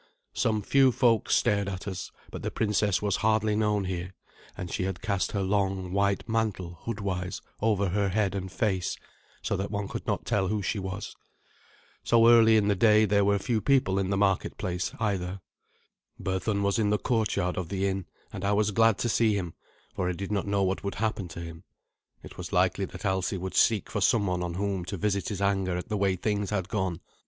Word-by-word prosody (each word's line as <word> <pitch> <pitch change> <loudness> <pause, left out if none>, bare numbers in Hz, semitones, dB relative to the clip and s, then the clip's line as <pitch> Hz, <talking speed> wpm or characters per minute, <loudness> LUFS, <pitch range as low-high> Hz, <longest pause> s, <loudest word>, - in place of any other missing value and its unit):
Some 110 -2 0
few 135 +3 +4
folk 115 -2 +2
stared 100 -1 +2
at 95 +1 -6
us; 95 -2 -5 0.2
but - - -6
the - - -2
princess 105 -2 0
was 100 -2 +1
hardly 110 -1 +2
known 105 -2 +1
here, 90 0 -4 0.4
and 90 -2 -5
she 90 - -1
had 95 +3 -4
cast 100 -3 -1
her 100 -2 0
long, 95 -2 0
white 100 +1 +1
mantle 105 -7 -2
hoodwise 100 -5 -3 0.2
over 100 -3 +2
her 100 +2 +1
head 100 -1 +1
and 95 -2 -4
face, 95 -6 -1 0.5
so 100 - 0
that 95 +1 -3
one 100 -1 -3
could - - -6
not - - -1
tell 95 -2 +1
who 105 +1 -1
she 105 +3 -1
was. 95 +2 -5 0.9
So 115 -1 +5
early 115 -2 +7
in 105 -1 +2
the 105 - +4
day 110 +1 +5
there 100 0 +3
were 100 0 +3
few 110 +2 -1
people 125 -9 +2
in 95 -1 -1
the 100 - 0
marketplace 95 -2 0
either. 100 -3 -1 0.8
Berthun 95 +2 -1
was 100 +3 +1
in 105 -2 +2
the 105 - +3
courtyard 105 -6 0
of 90 -3 -4
the 95 0 -1
inn, 95 -1 -3 0.3
and 95 - -6
I 100 +1 +2
was 105 0 +2
glad 115 0 +4
to - - +1
see 110 -2 +2
him, 90 -4 -4 0.4
for 90 - -1
I - - -1
did 100 +3 -5
not 100 -1 -1
know 100 -1 +1
what 95 +1 -1
would 100 - -3
happen 110 -3 -2
to 85 +1 -8
him. 85 -1 -9 0.6
It - - -11
was - - -6
likely - - +2
that - - -9
Alsi 95 0 0
would 95 +1 -5
seek 110 -3 +3
for 105 - -2
someone 95 -5 +2
on 85 -1 -3
whom 100 -1 -1
to 100 +2 -4
visit 100 +2 -1
his 100 -2 -3
anger 95 -3 +1
at 90 - -6
the 105 - -1
way 100 -2 +1
things 105 +1 -1
had 100 -3 -2
gone. 95 -5 -2
100 Hz, 210 wpm, -28 LUFS, 95-105 Hz, 0.9 s, early